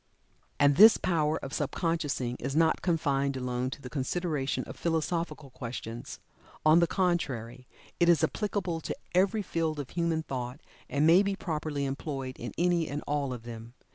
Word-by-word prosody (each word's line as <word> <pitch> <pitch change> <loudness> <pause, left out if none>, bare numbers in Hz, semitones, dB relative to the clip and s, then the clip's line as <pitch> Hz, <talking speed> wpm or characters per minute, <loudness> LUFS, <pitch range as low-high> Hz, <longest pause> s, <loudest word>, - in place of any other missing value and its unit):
And 145 -1 +5
this 215 +3 +9
power 160 -3 +1
of 135 - -7
sub 145 -2 -1
consciousing 145 -8 -1
is 135 +3 -3
not 160 0 +3
confined 140 -6 +1
alone 125 0 -2
to 135 - -8
the - - -6
consideration 145 0 -1
of - - -9
philosophical 160 -3 -2
questions. 115 -2 -7 0.5
On 155 +2 +7
the 170 - +4
contrary 130 - -1 0.3
it 175 - +4
is 165 -1 +5
applicable 180 -2 -1
to - - -4 0.2
every 200 +4 +2
field 160 -4 -1
of 140 - -6
human 170 -2 0
thought, 125 -1 -5 0.3
and 145 +2 +2
may 170 +4 +7
be 200 -1 0
properly 150 -5 -3
employed 135 -1 -4
in 120 - -5
any 175 -2 +2
and 145 +1 -4
all 145 -2 -1
of 120 -2 -6
them. 115 0 -9
150 Hz, 170 wpm, -29 LUFS, 135-170 Hz, 0.5 s, this